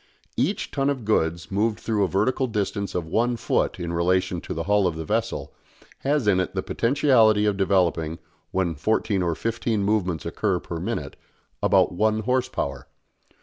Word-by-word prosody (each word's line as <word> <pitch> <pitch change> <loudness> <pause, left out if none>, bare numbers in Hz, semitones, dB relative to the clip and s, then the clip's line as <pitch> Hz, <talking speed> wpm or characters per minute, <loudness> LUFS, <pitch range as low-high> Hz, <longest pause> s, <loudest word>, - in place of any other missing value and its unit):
Each 165 - -1
ton 135 0 +1
of 130 -6 -3
goods 85 -6 0
moved 105 +2 0
through 110 -3 0
a - - +2
vertical 125 +8 +1
distance 100 -3 -2
of 90 -2 -1
one 120 +8 0
foot - - 0
in 85 -1 -3
relation 90 +1 +1
to - - -5
the 85 - -2
hull 105 0 +3
of 85 - -2
the 80 0 -5
vessel, - - -2 0.5
has 140 -4 0
in 95 -3 +4
it 95 - -2
the - - -1
potentiality 115 -5 +3
of 105 -1 +2
developing, 90 -5 +1 0.3
when 95 -3 0
fourteen 100 +4 0
or 85 -2 0
fifteen 115 +1 -1
movements 95 -5 0
occur - - 0
per - - -6
minute, - - -4 0.4
about - - +4
one 110 +4 +1
horse 125 +3 0
power. 70 - -4
100 Hz, 175 wpm, -24 LUFS, 90-115 Hz, 0.5 s, in